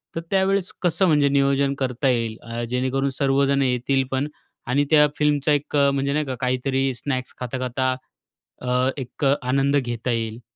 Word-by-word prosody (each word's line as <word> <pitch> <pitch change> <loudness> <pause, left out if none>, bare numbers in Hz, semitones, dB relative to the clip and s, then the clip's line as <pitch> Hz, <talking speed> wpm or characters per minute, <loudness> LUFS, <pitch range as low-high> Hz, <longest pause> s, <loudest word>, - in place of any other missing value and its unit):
तर 165 - -2
त्यावेळेस 195 -1 +1
कसं 175 +1 +2
म्हणजे 145 -3 +4
नियोजन 140 0 +2
करता 130 0 0
येईल? 115 -3 0
अ, 115 0 -5
जेणेकरून 130 +2 0
सर्वजण 140 0 +2
येतील 130 +1 +1
पण 135 +2 0 0.4
आणि 140 +4 +2
त्या 150 -1 +6
फिल्मचा 150 0 +2
एक 145 0 0
म्हणजे 140 -1 +2
नाही 150 +1 0
का, 130 -2 -3
काहीतरी 130 +1 0
स्नॅक्स 130 0 -4
खाता-खाता 130 +1 -1 0.7
अ, 125 +1 +1
एक 135 +1 -4
आनंद 135 +1 +2
घेता 120 -2 -2
येईल. 115 0 -3
135 Hz, 155 wpm, -23 LUFS, 125-140 Hz, 0.7 s, त्या